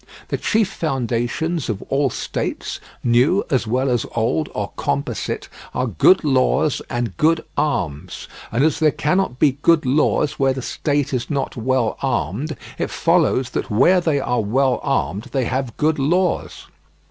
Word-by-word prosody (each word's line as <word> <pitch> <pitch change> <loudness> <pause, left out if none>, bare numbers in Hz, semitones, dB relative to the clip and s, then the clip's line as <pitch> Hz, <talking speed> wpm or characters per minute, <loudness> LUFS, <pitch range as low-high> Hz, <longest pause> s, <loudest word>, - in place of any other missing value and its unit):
The - - -1
chief 220 -2 +1
foundations 135 +1 -2
of 105 -3 -3
all 135 0 +1
states, - - -4 0.2
new 125 +11 +3
as 130 -4 +1
well 130 +4 +1
as 120 -3 +1
old 120 +7 0
or 105 -1 -3
composite, 120 -9 -2 0.3
are 125 - +1
good 125 - +4
laws 140 +1 +2
and 120 -7 -2
good 160 +1 +2
arms; 80 - -2 0.2
and 120 +5 +1
as 155 -1 +2
there 155 - +4
cannot 150 -1 0
be 140 0 +2
good 165 -3 +4
laws 150 +2 +1
where 135 -1 +3
the 130 -1 -5
state 145 0 -1
is 125 -1 -2
not 140 -3 -2
well 125 -1 0
armed, 125 - -2 0.2
it - - -1
follows 130 -2 +2
that - - -3
where 175 - +4
they 160 -4 +1
are 125 -3 0
well 130 +5 +1
armed 95 - -1
they 135 -3 +1
have 130 -1 -3
good 155 0 +1
laws. 175 +6 0
135 Hz, 160 wpm, -20 LUFS, 120-155 Hz, 0.3 s, good